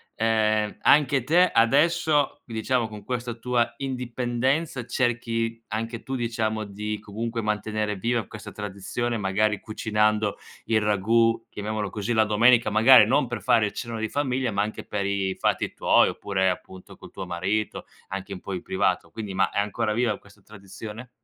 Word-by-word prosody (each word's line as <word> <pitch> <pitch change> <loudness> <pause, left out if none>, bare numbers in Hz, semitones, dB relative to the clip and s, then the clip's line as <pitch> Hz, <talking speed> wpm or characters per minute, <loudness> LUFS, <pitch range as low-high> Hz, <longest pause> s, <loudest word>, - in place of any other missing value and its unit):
ehm, 110 -1 +1
anche 140 -3 +4
te 175 +6 +4
adesso, 145 +4 +3
diciamo, 115 +1 -1
con 105 -1 -10
questa 125 -1 -3
tua 120 0 0
indipendenza 125 +2 -2
cerchi 115 -2 -1
anche 115 +2 -4
tu 135 - -4
diciamo 110 -2 -1
di, 105 +1 -4
comunque 115 +3 -4
mantenere 105 0 -1
viva 115 +3 -1
questa 110 - -9
tradizione 105 +4 -3
magari 105 +1 +1
cucinando 105 -1 0 0.3
il 110 -1 +2
ragù, 115 +3 +2
chiamiamolo 105 0 -3
così, 105 +4 -3
la 110 -1 +4
domenica, 115 +3 +4
magari 110 +2 +7
non 135 +1 +2
per 120 - -5
fare 110 -2 +3
il - - -5
cenone 115 -2 -5
di 110 - -2
famiglia 130 -3 -1
ma 100 0 0
anche 110 +1 -4
per 100 -1 -3
i 100 -1 -1
fatti - - 0
tuoi, - - +4
oppure 95 -2 0
appunto, 90 +1 -7
col - - -13
tuo 95 - -6
marito, 95 +5 -2 0.2
anche 95 0 -5
un 90 - -7
po' 100 - -6
in 90 - -4
privato, 95 -1 0
quindi 105 -4 -6
ma 95 - +2
è - - -1
ancora 105 +2 -1
viva 115 -3 +1
questa 100 0 -20
tradizione? 105 +4 -10
110 Hz, 165 wpm, -25 LUFS, 105-120 Hz, 0.3 s, magari